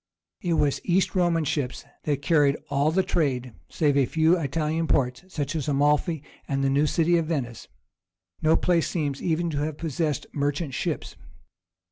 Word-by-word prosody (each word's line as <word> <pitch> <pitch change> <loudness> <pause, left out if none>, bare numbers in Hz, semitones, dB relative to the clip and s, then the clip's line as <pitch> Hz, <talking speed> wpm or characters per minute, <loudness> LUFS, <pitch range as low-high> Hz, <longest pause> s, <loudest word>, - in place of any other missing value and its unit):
It 175 -2 0
was 140 -4 +1
East 185 +1 +1
Roman 175 -3 +2
ships 140 -3 -2 0.2
that 145 -2 -1
carried 145 -2 +3
all 140 +2 +2
the 190 +4 +2
trade; 130 -9 -1 0.2
save 145 -3 +1
a 135 -3 +3
few 160 +4 +3
Italian 160 +1 -1
ports, 125 +1 +1
such 150 -4 -3
as 155 -2 -2
Amalphi 150 +2 +1 0.2
and 135 0 -1
the 135 - +2
new 145 +2 +3
city 170 +2 +2
of 160 - -2
Venice, 130 -8 -3 0.7
no 160 +1 +4
place 170 -2 +1
seems 145 -5 -2
even 170 0 0
to 145 - -2
have 150 0 -2
possessed 155 -2 -2
merchant 145 0 -1
ships. - - -3
150 Hz, 165 wpm, -25 LUFS, 140-165 Hz, 0.7 s, no